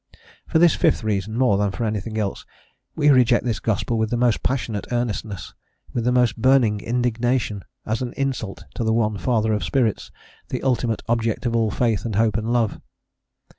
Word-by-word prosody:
* - - -46
Voysey. - - -23 0.3
For - - +4
this 170 -1 +6
fifth - - +1
reason, 110 +1 -2
more 120 -6 +3
than 105 -1 +1
for 95 - -4
anything 110 +1 -3
else, 105 -3 -2 0.5
we 150 -1 +3
reject 125 -3 +4
this 115 -4 -1
gospel 110 +1 -1
with 110 -1 0
the 120 - -1
most 120 -1 +2
passionate 120 -6 -2
earnestness, 110 -5 -3 0.4
with 120 -2 -1
the 125 - +3
most 125 -2 +2
burning 125 -5 +4
indignation, 120 -3 -1 0.2
as 110 +2 -2
an 125 -1 -3
insult 130 -7 -3
to - - -3
the 110 0 +1
One 110 -3 0
Father 110 -2 +1
of 105 - -1
spirits, 120 -6 0 0.4
the - - -4
ultimate 120 -3 0
Object 115 0 0
of 115 -1 0
all 115 -1 +2
faith 115 0 0
and 110 -4 -3
hope 110 -1 +2
and 110 +1 -1
love. 120 -3 0
115 Hz, 195 wpm, -22 LUFS, 110-125 Hz, 0.5 s, this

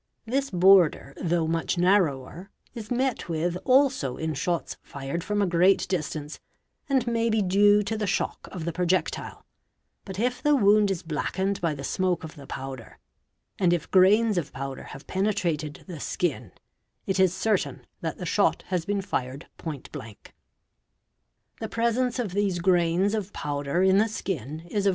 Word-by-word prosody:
§ - - -52 0.3
This 275 +1 0
border, 180 -6 +4
though 170 -1 +1
much 165 +2 -1
narrower, 175 -2 +1 0.2
is 225 -4 -8
met 250 -5 -1
with 170 +2 -1
also 255 - +3
in 160 0 -2
shots 160 +1 -2
fired 140 +4 -5
from 205 +2 0
a - - +3
great 180 +2 +3
distance, 155 -4 -3 0.5
and 265 -3 +2
may 230 -1 +1
be 220 -2 +2
due 205 +2 +4
to 220 +2 -2
the 215 -1 -2
shock 195 - -2
of 175 -5 -6
the 170 - -2
projectile; 180 +2 -1 0.6
but 190 -2 -8
if 245 +3 0
_ - - -20
the 295 0 +4
wound 210 -3 +4
is 190 -4 -2
blackened 190 +5 -2
by 165 -3 0
the 140 - -7
smoke 185 +4 0
of 160 - -8
the 140 -4 -12
powder 130 -4 -7 0.6
and 175 -2 +3
if 175 - -3
grains 205 +2 +5
of: 160 - -6
powder 135 0 -6
have 140 - -10
penetrated 175 -7 -1
the 175 -5 -8
skin, 135 - -2 0.5
it 190 -1 -1
is 190 -2 +5
certain 195 +2 -1
that - - -4
the - - -6
shot - - +1
has 180 -3 -1
been 200 0 -1
fired 130 -3 -4
point 150 -6 -6
blank. 110 -2 -10 1.3
The - - -4
presence 235 +2 0
of 235 -7 -2
these 195 -1 0
grains 175 +2 +2
of 210 -2 -2
powder 145 +4 -1
in 190 +1 +5
the 220 +2 +2
skin 155 - -4
is 200 +4 -2
of - - +6
185 Hz, 175 wpm, -26 LUFS, 160-205 Hz, 1.3 s, of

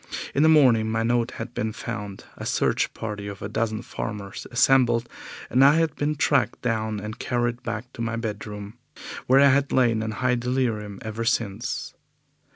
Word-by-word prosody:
In 140 - +2
the 160 - +6
morning 125 -8 +5
my 110 +1 0
note 120 +1 +1
had 115 +1 -6
been 110 -2 -2
found, 105 -4 -6
a - - -8
search - - +1
party 105 -2 -5
of 100 -1 -7
a - - -2
dozen 110 +1 -2
farmers 100 -2 -6
assembled, 120 -2 +3 0.4
and 130 +2 +4
I 140 +2 +7
had 165 -2 +1
been 150 +1 -1
tracked 140 -2 +1
down 110 -3 -1
and 105 +2 -7
carried 120 0 -1
back 120 +1 -5
to - - -7
my 115 0 -1
bedroom, 105 -1 -6 0.5
where 130 +2 +6
I 140 0 +7
had 140 +1 +2
lain 115 -4 +3
in 110 - -2
high 125 +2 +1
delirium 120 -5 -1
ever 110 +1 -4
since. 115 -1 -2
115 Hz, 175 wpm, -25 LUFS, 110-125 Hz, 0.5 s, I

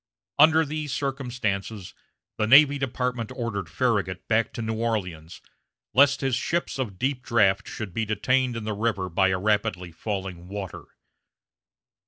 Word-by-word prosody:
Under 160 +1 +6
these 150 -1 -4
circumstances, 120 -8 -3 0.5
the 110 - +1
Navy 140 +3 +7
Department 125 -3 -2
ordered 100 -8 -3
Farragut 100 -3 -1
back 115 0 +1
to 115 - -4
New 110 0 -2
Orleans, 90 -8 -3 0.5
lest 140 +1 +5
his 135 -3 +1
ships 170 +3 -2
of 105 -8 -3
deep 130 +2 -1
draft 105 -4 +2
should 110 -7 -6
be 115 +2 -1
detained 125 +4 +1
in 115 - -5
the 110 0 -2
river 105 -3 -1
by 95 +3 +2
the 95 - +1
rapidly 95 -3 0
falling 95 -1 -5
water. 100 -2 -6
110 Hz, 145 wpm, -25 LUFS, 95-130 Hz, 0.5 s, Navy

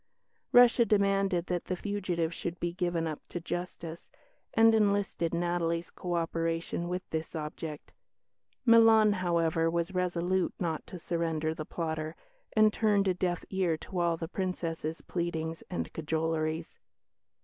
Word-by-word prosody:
Russia 245 0 +7
demanded 195 -4 +2
that 180 -1 -2
the 185 - -2
fugitive 180 -4 -2
should 170 +1 -5
be 175 0 -2
given 175 -2 -1
up 155 -2 -4
to 175 - -4
justice, 170 -1 -6 0.5
and 225 0 +6
enlisted 200 -5 +1
Natalie's 170 -1 -1
co 175 -1 -3
operation 165 +1 -1
with 180 +1 -3
this 160 +1 -3
object. 155 0 -6 0.7
Milan, 225 -2 +7
however, 170 -3 +1
was 170 +2 -1
resolute 180 0 0
not 165 -4 -2
to 185 - -7
surrender 165 -2 -1
the 155 -1 -6
plotter, 160 -1 -3 0.4
and 215 -1 +5
turned 205 -3 +2
a 185 - +3
deaf 180 -1 -2
ear 185 -4 +1
to 185 +3 -5
all 170 -1 +2
the 165 - -4
Princess's 165 -3 -3
pleadings 165 -2 -3
and 180 - -4
cajoleries. 160 0 -2
175 Hz, 140 wpm, -30 LUFS, 165-185 Hz, 0.7 s, Russia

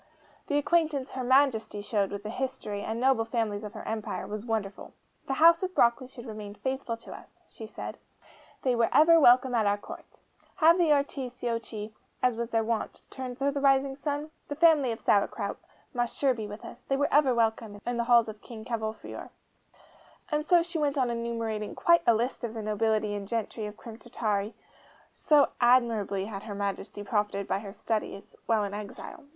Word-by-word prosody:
The 290 - +1
acquaintance 295 -3 +1
HER 260 - -4
MAJESTY 245 -5 +2
showed 205 -2 0
with 200 0 -6
the 215 - -5
history, 235 -5 -4
and 220 +2 -3
noble 260 -2 +3
families 225 -3 -2
of 210 - -8
her - - -8
empire, 220 -1 -3
was 215 +2 -6
wonderful. 210 -3 -3 0.3
'The 270 - -1
House 335 +3 +6
of 370 -1 -3
Broccoli 235 +2 +3
should 250 -2 -11
remain 210 -3 -7
faithful 260 -1 -3
to 230 - -12
us,' - - -15
she 220 - -10
said; - - -7 0.6
'they 255 -2 +2
were 230 - +3
ever 330 +2 +7
welcome 250 -2 +6
at 220 -3 +2
our 200 0 +2
Court. - - -12 0.4
Have 335 0 +5
the 340 -3 +3
Articiocchi, 245 -6 -2 0.3
as 250 -2 +3
was 235 0 -3
their 225 -1 +1
wont, 225 -1 -3
turned 255 -2 -6
to 280 +1 +1
the 280 0 -3
Rising 270 -1 +3
Sun? 290 +2 -3 0.2
The 290 - -4
family 305 -5 +4
of 225 - -5
Sauerkraut 200 -1 0 0.3
must 240 -2 -2
sure 275 -2 +3
be 220 -3 -5
with 210 +1 -9
us - - -10
they 270 - +1
were 285 -1 0
ever 275 -4 +4
welcome 220 -2 0
in 245 0 -2
the 235 - 0
halls 235 -1 +5
of 215 -1 -8
King 220 -2 -10
Cavolfiore.' 220 -2 -5 1.0
And 300 0 +1
so 350 -2 +5
she 340 -1 -4
went 290 -1 0
on 250 -3 +1
enumerating 230 -2 -3
quite 340 0 +4
a 235 - +6
list 240 +3 -2
of 230 -1 -4
the 220 - -4
nobility 215 0 0
and 200 -1 -5
gentry 225 -1 -3
of 210 +1 -10
Crim 225 -2 -10
Tartary, 215 -4 -2 0.6
so 295 -2 +4
admirably 230 -6 +3
had 200 -2 -6
Her 205 -2 -7
Majesty 200 0 -4
profited 205 -1 -1
by 190 - 0
her 200 -1 -8
studies 215 -2 -4
while 225 -2 +2
in 200 0 -4
exile. 210 +8 -8
235 Hz, 190 wpm, -28 LUFS, 215-270 Hz, 1.0 s, ever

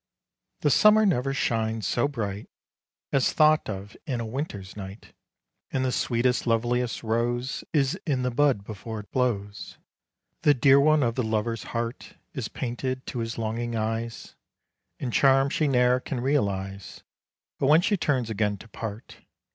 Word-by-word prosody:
The - - +3
summer 215 0 +6
never 135 -8 +1
shines 110 -4 -1
so 120 - +1
bright 105 -7 -4 0.6
As 135 -2 +2
thought 155 -3 +4
of 100 0 -6
in 130 -4 -1
a 115 - -3
winter's 110 -6 -5
night; 100 +1 -9 0.6
And 130 -1 -1
the 130 - +1
sweetest 125 +1 0
loveliest 120 +1 0
rose 120 +3 -1
Is 140 -4 +1
in 130 -4 0
the 125 - 0
bud 135 -5 +2
before 110 +1 -6
it 105 - -19
blows; 105 -5 -2 0.6
The 145 -1 +5
dear 135 +2 +6
one 155 0 +4
of 115 -1 +1
the 125 - -1
lover's 110 -1 -1
heart 115 +1 -5 0.2
Is 130 -7 -3
painted 130 +1 -4
to 125 - -5
his 115 0 -3
longing 115 +1 -2
eyes, 115 +1 -3 0.6
In 125 - -4
charms 135 +1 +4
she 155 - +1
ne'er 125 -1 +3
can 130 0 -4
realize 100 -8 -2 0.6
But 135 - +1
when 155 +4 +6
she 205 - +2
turns 130 - 0
again 105 -1 0
to 110 - -13
part. 110 0 -7
120 Hz, 155 wpm, -26 LUFS, 110-135 Hz, 0.6 s, summer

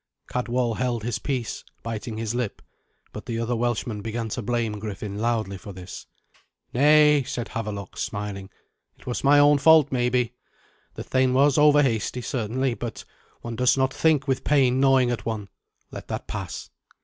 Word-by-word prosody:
Cadwal 125 -2 -1
held 120 -4 -1
his 120 0 -2
peace, 125 -6 -3 0.2
biting 115 0 -5
his 110 0 -2
lip, 120 -4 -3 0.5
but - - -8
the 115 -2 -2
other 115 +1 -1
Welshman 120 -2 -2
began 115 +1 -4
to 125 - -3
blame 115 -2 -2
Griffin 105 -1 -5
loudly 110 -4 -1
for 100 +1 -9
this. 90 0 -9 0.7
"Nay," 150 +2 +5
said 120 -2 -5
Havelok, 105 -3 -5
smiling; 100 -2 -4 0.5
"it - - -20
was 125 - -3
my 140 +1 +6
own 145 0 +6
fault 160 0 +6
maybe. 125 -1 +1 0.6
The - - -6
thane 130 -1 +1
was 140 +1 +4
overhasty 135 -5 +3
certainly, 125 +2 -1
but 115 -1 -6 0.4
one 120 -1 -6
does 125 +3 +3
not 130 0 +1
think 155 -3 +2
with 135 -1 0
pain 130 -3 +3
gnawing 135 -2 +4
at 120 - -4
one. 105 -3 -4 0.4
Let - - -8
that - - -4
pass. - - -6
120 Hz, 160 wpm, -25 LUFS, 110-130 Hz, 0.7 s, my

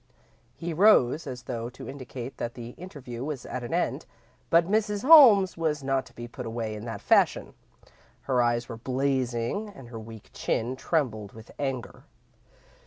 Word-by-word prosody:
He 170 0 -4
rose 165 - +4
as 125 -1 -6
though 120 -2 -4
to 125 - -11
indicate 130 -1 -7
that 120 - -4
the 120 -1 -7
interview 130 -8 -8
was 145 -3 -5
at 125 - -5
an 120 - -6
end, 175 +2 -1 0.4
but 170 0 +5
Mrs. 210 +1 0
Holmes 245 - +8
was 155 -3 -1
not 135 -1 0
to - - -18
be 120 0 -7
put 120 0 -7
away 115 -1 -3
in 105 +1 -7
that 115 - -6
fashion. - - +2 0.7
Her 130 -2 +1
eyes 120 0 +1
were 115 - -7
blazing 130 - -1
and 135 -12 -13
her 115 -2 -7
weak 110 -1 -12
chin 120 +3 -1
trembled 120 - -2
with 110 0 -13
anger. 135 -4 -4
130 Hz, 170 wpm, -27 LUFS, 120-165 Hz, 0.7 s, Holmes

